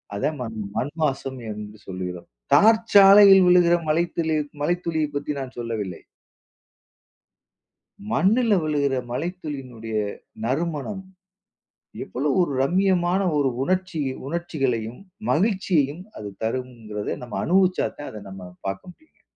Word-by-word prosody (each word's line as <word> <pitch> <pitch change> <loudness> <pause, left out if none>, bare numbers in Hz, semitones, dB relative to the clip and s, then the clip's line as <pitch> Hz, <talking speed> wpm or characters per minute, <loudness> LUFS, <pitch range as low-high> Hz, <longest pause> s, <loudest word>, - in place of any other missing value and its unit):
அதான் 145 +8 -1
மண் 110 -2 -5 0.2
மண் 140 - -1
மாசம் 135 -2 -2
என்று 105 0 -8
சொல்கிறோம். 90 -2 -6 0.3
தார் 220 +1 +6
சாலையில் 195 -1 +9
விழுகிற 175 -1 +5
மழைத்துளி 165 0 0 0.3
மழைத்துளியை 165 -1 0
பத்தி 145 +1 -2
நான் 130 -1 -7
சொல்லவில்லை. 110 -6 -4 2.1
மண்ணுல 205 - +3
விழுகிற 145 -3 0 0.2
மழைத்துளினுடைய, 135 -8 -5 0.5
நறுமணம். 160 - -2 1.0
எவ்வளோ 130 +10 -2
ஒரு 175 -5 +1
ரம்மியமான 185 +3 +2 0.2
ஒரு 140 -2 +2
உணர்ச்சி 185 0 -1 0.3
உணர்ச்சிகளையும், 135 -9 -2 0.3
மகிழ்ச்சியையும் 180 -5 +1
அது 105 -1 -6
தரும்ங்கிறத, 115 -3 -4 0.2
நம்ம 120 - -5
அனுபவிச்சா 185 +1 +2
தான் 145 - -6
அத 105 - -8
நம்ம 95 -2 -10
பார்க்க 95 - -5
முடியும்ங்க. 315 - -31
150 Hz, 105 wpm, -24 LUFS, 120-180 Hz, 2.1 s, சாலையில்